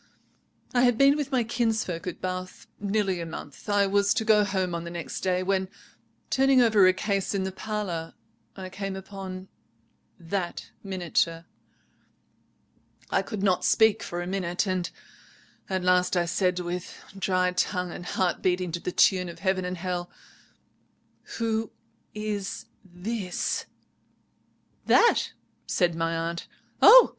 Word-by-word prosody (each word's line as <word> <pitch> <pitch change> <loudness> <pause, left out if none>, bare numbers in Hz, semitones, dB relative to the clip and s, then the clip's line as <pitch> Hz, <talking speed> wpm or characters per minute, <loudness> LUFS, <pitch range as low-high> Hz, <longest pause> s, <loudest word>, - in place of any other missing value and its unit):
"I 245 - +4
had 245 -2 +4
been 275 +2 +6
with 295 -2 -3
my 255 -3 +2
kinsfolk 220 -7 -1
at 180 - -4
Bath 185 0 -5
nearly 200 -3 0
a - - -4
month. 150 +2 -9
I 205 -1 +4
was 200 +1 +2
to 225 -3 0
go 215 -2 +5
home 190 -3 -1
on 170 0 -3
the 170 - -6
next 170 -1 -5
day, 185 -1 +1
when, 190 0 0 0.6
turning 270 0 +4
over 220 -6 +6
a - - +7
case 200 +1 -1
in 195 - 0
the 190 - -2
parlour, 190 -5 -4 0.4
I 190 -1 -6
came 195 0 -4
upon 190 -1 -7 0.7
that 175 +1 -4
miniature. 175 -3 -1 1.7
I - - +3
could 210 -4 -5
not 185 -3 +2
speak 220 -1 +4
for 175 -4 -4
a - - -5
minute. 180 0 -1
At 185 0 -6
last 180 0 +3
I 175 - +2
said, 180 +1 +1
with 180 0 -5 0.2
dry 185 -1 +1
tongue, 180 0 -1
and 175 - -7
heart 185 -3 0
beating 180 -1 0
to 170 - -3
the 180 - -3
tune 180 -1 +3
of 170 - -9
heaven 190 -1 0
and 180 0 -3
hell— 180 0 -3 1.3
"'Who 225 -1 0 0.5
is 210 -2 -3 0.2
this?' 190 +1 -3 1.2
"'That?' 470 - +4 0.3
said 175 -2 +2
my 165 0 -1
aunt. 165 +1 -3 0.3
'Oh! - - +10
185 Hz, 145 wpm, -27 LUFS, 180-205 Hz, 1.7 s, Oh